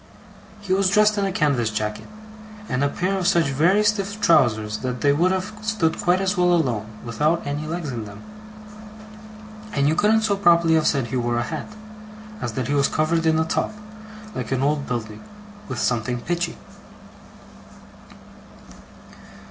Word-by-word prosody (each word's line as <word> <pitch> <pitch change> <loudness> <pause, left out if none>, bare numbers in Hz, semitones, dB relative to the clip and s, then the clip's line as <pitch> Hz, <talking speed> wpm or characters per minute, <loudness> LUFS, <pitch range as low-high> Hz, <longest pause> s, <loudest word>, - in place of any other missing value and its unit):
He 195 -2 -1
was 190 0 +3
dressed 210 +1 +3
in 200 - +1
a 195 - -1
canvas 140 -9 +1
jacket, 105 -1 -4 0.6
and 125 +2 -1
a 140 - +2
pair 185 +6 -1
of 180 - 0
such 170 -6 +3
very 170 +10 +3
stiff 205 -1 0
trousers 110 - +3
that 125 -2 -4
they 140 -1 +4
would 175 +5 +2
have 190 +2 -2
stood 215 -7 0
quite 180 +1 +2
as 195 +1 0
well 180 -1 +3
alone, 120 -10 -1 0.2
without 150 +9 0
any 145 +2 -3
legs 165 -3 -4
in 115 -3 -5
them. 105 0 -11 1.5
And 140 0 +2
you 155 - +3
couldn't 215 +6 +3
so 210 -2 +1
properly 170 -3 +4
have 160 -1 +3
said 135 -5 0
he 130 - -2
wore 120 -1 0
a 120 - 0
hat, - - -5 0.7
as 120 - -3
that 125 +1 -3
he 145 - -1
was 140 -1 +3
covered 165 +1 0
in 160 0 +3
a 160 - +1
top, 165 - -1 0.6
like 125 -1 -5
an 130 0 0
old 145 0 0
building, 110 -3 -5 0.5
with - - -4
something 120 0 -1
pitchy. 175 +2 -2
155 Hz, 170 wpm, -22 LUFS, 125-185 Hz, 1.5 s, they